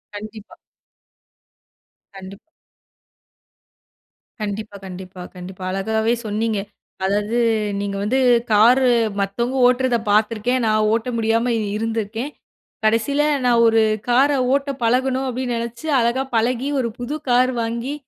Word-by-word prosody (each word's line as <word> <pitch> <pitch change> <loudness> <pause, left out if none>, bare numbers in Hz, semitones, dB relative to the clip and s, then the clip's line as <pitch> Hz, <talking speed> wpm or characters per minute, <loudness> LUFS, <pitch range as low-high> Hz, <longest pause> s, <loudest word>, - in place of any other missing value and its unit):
கண்டிப்பா. 215 +1 -9 1.6
கண்டிப்பா. 195 +1 -11 2.0
கண்டிப்பா, 205 0 -5
கண்டிப்பா, 185 0 -9
கண்டிப்பா. 185 +1 -9
அழகாவே 220 +4 0
சொன்னீங்க. 215 0 -1 0.4
அதாவது 205 +4 0 0.4
நீங்க 200 0 -3
வந்து 245 +6 +1 0.3
கார்ரு 245 +5 +5 0.3
மத்தவங்க 235 +6 -1
ஓட்றத 250 -1 +2 0.2
பார்த்துருக்கேன், 225 +4 +1
நான் 215 -1 +2
ஓட்ட 230 +2 -1
முடியாம 230 +2 +1 0.2
இருந்திருக்கேன். 225 +4 -3 0.5
கடைசியில, 230 +7 +2 0.2
"நான் 235 -1 +4
ஒரு 225 0 +4 0.3
கார 260 +4 +4 0.2
ஓட்டப் 280 -1 -1
பழகணும்" 260 +3 +1
அப்டின்னு 250 -1 -2
நெனைச்சு, 235 +6 -6
அழகா 240 +3 +1
பழகி, 245 +4 +1
ஒரு 240 - 0
புது 245 +5 -4
கார் 250 +1 +4
வாங்கி, 235 +4 -3
230 Hz, 105 wpm, -20 LUFS, 210-250 Hz, 2.0 s, கார்ரு